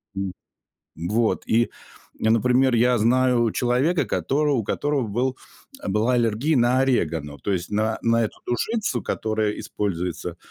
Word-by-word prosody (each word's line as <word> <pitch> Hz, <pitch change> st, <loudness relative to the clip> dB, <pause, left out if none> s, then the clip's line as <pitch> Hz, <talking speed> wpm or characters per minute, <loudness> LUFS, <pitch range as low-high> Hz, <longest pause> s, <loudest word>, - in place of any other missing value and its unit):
М 95 Hz, -1 st, -3 dB, 0.6 s
Вот. 105 Hz, +8 st, 0 dB
И, 115 Hz, +1 st, +2 dB, 0.5 s
я, 110 Hz, -, +2 dB
например, 125 Hz, +2 st, +3 dB
я 120 Hz, +1 st, +3 dB
знаю 120 Hz, +1 st, +3 dB
человека, 130 Hz, +8 st, +1 dB
который 145 Hz, +2 st, 0 dB
у 115 Hz, -5 st, 0 dB
которого 145 Hz, +2 st, -1 dB
был, 125 Hz, +5 st, -1 dB, 0.5 s
была 105 Hz, +5 st, +1 dB
аллергия 120 Hz, +6 st, +1 dB
на 125 Hz, +1 st, +3 dB
орегано, 80 Hz, -, 0 dB
то 100 Hz, -, -2 dB
есть 90 Hz, -2 st, -3 dB
на 110 Hz, +1 st, 0 dB
на, 115 Hz, 0 st, +3 dB
м, -, -, +2 dB
эту -, -, -13 dB
душицу, 195 Hz, -, -1 dB
которая 110 Hz, -1 st, -1 dB
используется 90 Hz, -4 st, -3 dB
115 Hz, 145 wpm, -23 LUFS, 105-130 Hz, 0.6 s, например